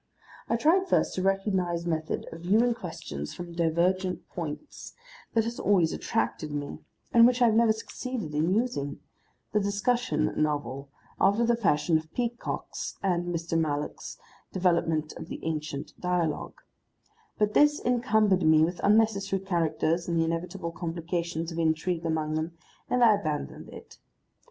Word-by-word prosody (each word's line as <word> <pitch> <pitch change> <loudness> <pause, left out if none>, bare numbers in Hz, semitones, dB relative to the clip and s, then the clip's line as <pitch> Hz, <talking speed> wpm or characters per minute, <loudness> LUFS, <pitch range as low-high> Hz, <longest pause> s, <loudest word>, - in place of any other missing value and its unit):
I - - +2
tried 340 +10 +3
first - - +2
a - - 0
recognised 190 -3 0
method 160 -2 -2
of 165 - -9
viewing 220 +7 +3
questions 75 - -6
from 175 -1 -7
divergent 175 +3 0
points 170 - -7 0.4
that 225 - +4
has 235 +1 -4
always 180 -5 +3
attracted 160 -8 -2
me 145 -1 -4 0.3
and 235 0 +8
which 250 0 +1
I 245 - +6
have 225 - +4
never 225 0 +5
succeeded 225 - -5
in 160 +6 +2
using, 175 - -1 0.5
the 210 - +4
discussion 235 +5 0
novel, 145 -2 -1 0.3
after 215 +4 +4
the 235 0 +3
fashion 165 -6 +2
of 160 +1 -14
Peacock's 240 -1 -3
(and 175 -2 0
Mr. 170 -1 -2
Mallock's) 150 -3 -2 0.3
development 165 -4 +1
of - - -8
the - - -6
ancient 150 -3 -3
dialogue; 180 -3 -1 0.8
but 210 0 +1
this 295 0 +5
encumbered 220 -6 +3
me 155 -1 +5
with 175 +2 -4
unnecessary 200 -2 +2
characters 170 -2 0
and 170 -1 0
the 165 - +3
inevitable 170 +1 -3
complication 170 0 -3
of 170 0 -5
intrigue 165 +1 0
among 155 -1 -1
them, 160 +2 -2 0.4
and 250 -1 +3
I 225 -2 +7
abandoned 155 -8 -3
it. - - -12
175 Hz, 145 wpm, -28 LUFS, 160-215 Hz, 0.8 s, and